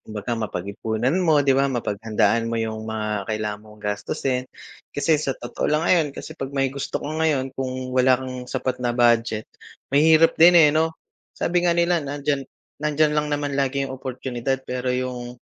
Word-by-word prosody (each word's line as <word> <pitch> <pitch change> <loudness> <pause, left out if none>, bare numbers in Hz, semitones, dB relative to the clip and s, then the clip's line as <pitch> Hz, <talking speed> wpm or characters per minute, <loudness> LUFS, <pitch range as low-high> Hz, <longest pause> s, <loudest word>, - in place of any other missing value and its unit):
kumbaga 110 +2 -5
mapagipunan 110 - -2
mo, 155 -5 +3
'di 135 - +4
ba? 135 +1 +2
Mapaghandaan 115 -1 0
mo 115 - -2
yung 110 -1 -3
mga 105 -2 -3
kailangan 105 -1 -3
mong 105 -1 -16
gastusin. 125 +5 -2 0.5
Kasi 150 +1 +2
sa 135 -3 -2
totoo 120 - -3
lang 150 +2 +1
ngayon, 165 -4 +4
kasi - - -7
pag 135 -4 -5
may 135 -1 +1
gusto 140 - -3
ka - - -5
ngayon, 140 -5 +1
kung 130 -1 -4
wala 130 0 +4
kang 130 -1 -7
sapat 130 -1 -2
na 120 -1 -1
budget, 115 -2 +3 0.5
mahirap 160 +3 +6
din, 175 +1 +8
eh, 155 -3 +8
'no? 160 +1 +1 0.4
Sabi 175 0 +1
nga 170 - +2
nila 170 0 +2
nandiyan 145 -1 -2 0.4
nandiyan 150 0 +2
lang 150 0 0
naman 145 -1 -1
lagi 140 0 0
oportunidad 130 0 -4
pero 125 0 -3
yung 125 -1 -3
130 Hz, 170 wpm, -23 LUFS, 115-145 Hz, 0.5 s, din